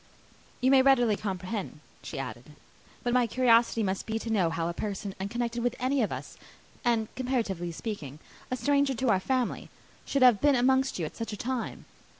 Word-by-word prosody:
"You 260 +1 +4
may 270 -1 +7
readily 245 -5 +4
comprehend," 190 -2 -4 0.2
she - - -7
added, - - -7 0.5
"what 245 -1 0
my 250 -1 +3
curiosity 230 -1 +3
must 190 -1 -2
be 220 0 -1
to 225 0 -4
know 190 -6 +2
how 165 0 -2
a 170 - -2
person 200 +1 -4
unconnected 235 +4 -2
with 245 0 0
any 260 +1 +1
of 215 - 0
us, - - -7 0.5
and, 230 -3 +2
comparatively 225 -10 -2
speaking, 160 - -6 0.3
a 255 - -2
stranger 280 0 +2
to 255 +1 0
our 195 - +4
family, 255 +4 -1 0.3
should 275 -2 +1
have 245 -5 +6
been 290 -1 +5
amongst 265 +2 +2
you 170 - -2
at - - -8
such 230 -1 -5
a - - -5
time. 250 +2 -4
235 Hz, 185 wpm, -28 LUFS, 200-255 Hz, 0.5 s, may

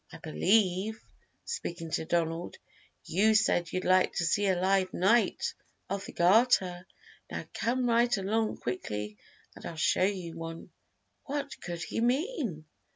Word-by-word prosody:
"I 165 - -9
believe" 190 +5 +1 0.5
speaking 170 - -5
to 160 - -1
Donald 165 0 -1 0.5
"you 215 +5 +3
said 175 -5 +2
you'd 185 - -2
like 185 0 +4
to 175 - 0
see 200 +5 +2
a 185 -2 +2
live 190 0 +2
Knight 220 +6 +2 0.4
of 200 0 -2
the - - -8
Garter; 185 -2 +3 0.4
now - - -5
come 245 +2 0
right 235 -1 +3
along 215 +3 0
quickly 105 -4 -4 0.4
and - - -13
I'll 165 - -6
show 155 - +1
you 185 -4 -1
one." 165 0 -7 0.5
What 280 -1 -4
could 170 -1 -5
he 225 - -3
mean? 250 - -1
185 Hz, 145 wpm, -30 LUFS, 170-225 Hz, 0.5 s, like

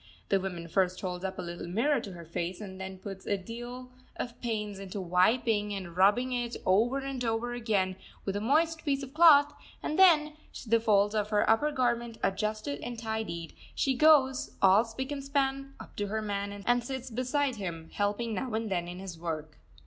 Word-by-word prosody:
The 195 - +3
woman 180 -3 -5
first 185 +1 +1
holds 180 -1 -4
up 190 0 -3
a 185 - -4
little 175 0 -6
mirror 245 +10 +2
to 195 - -8
her 170 -1 -10
face, 170 +2 -3
then 190 -2 -7
puts 190 0 -9
a 200 - +1
deal 240 +5 -8 0.2
of 245 -1 -6
pains 210 -4 -3
into 195 +1 -6
wiping 205 +3 +2
and 180 -3 -7
rubbing 210 +7 +3
it, 240 -1 -2
over 225 +8 +3
and 270 -2 -4
over 230 +1 -1
again, 205 -6 0 0.3
with 195 - -2
a 205 - -1
moist 315 +7 +2
piece 280 -2 0
of 270 0 -9
cloth; 295 -3 +7 0.3
and 310 - -2
then, 310 -5 +6 0.3
the 230 0 +3
folds 205 -2 +3
of 210 -1 0
her 210 -1 +2
upper 260 +7 +3
garment 240 -3 0
adjusted 215 +7 -1
and 240 -1 -5
tidied, 220 -7 -4 0.2
she 270 - +2
goes, 265 -2 +4
all 195 +3 +6
spick 260 +5 -5
and 280 -1 -4
span, 275 0 -1
up - - -12
to 205 - -1
her 220 +2 -2
man 200 -1 -4
and 245 0 +3
sits 260 0 -5
beside 255 +2 0
him, 165 -5 -6
helping 205 +3 -1
him - - -3
now 245 +5 -3
and 220 -2 -2
then 175 -2 -1
in 175 +1 -7
his 185 -3 -8
work. 155 -2 -5
220 Hz, 195 wpm, -30 LUFS, 190-255 Hz, 0.3 s, cloth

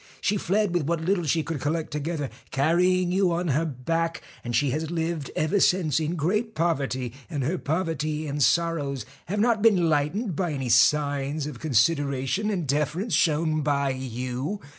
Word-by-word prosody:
She 205 - +1
fled 200 0 0
with 170 -5 0
what 165 -1 -1
little 180 -2 +1
she 160 +2 +1
could 150 -2 -4
collect 155 +3 -2
together, 150 -1 -3 0.2
carrying 175 +5 +2
you 185 -1 +2
on 170 0 -1
her 150 +4 +1
back, 165 +4 -2 0.2
and 120 0 -3
she 140 +2 +2
has 155 +3 -2
lived 165 -3 -2
ever 155 +6 +1
since 170 -6 +3
in 160 +2 -2
great 210 +8 -1
poverty, 135 -7 -1 0.2
and 145 -5 -2
her 165 +7 -1
poverty 155 -1 -2
and 145 0 -3
sorrows 145 -6 +1 0.2
have 205 +5 -2
not 225 -1 +2
been 190 -7 +4
lightened 160 +7 0
by 175 -1 -1
any 135 -3 -3
signs 140 +4 +2
of 145 -6 -7
consideration 140 - +1
and 185 -6 -1
deference 150 - -1
shown 155 0 +2
by 140 -1 +1
you. 130 - -4
155 Hz, 170 wpm, -25 LUFS, 140-175 Hz, 0.2 s, been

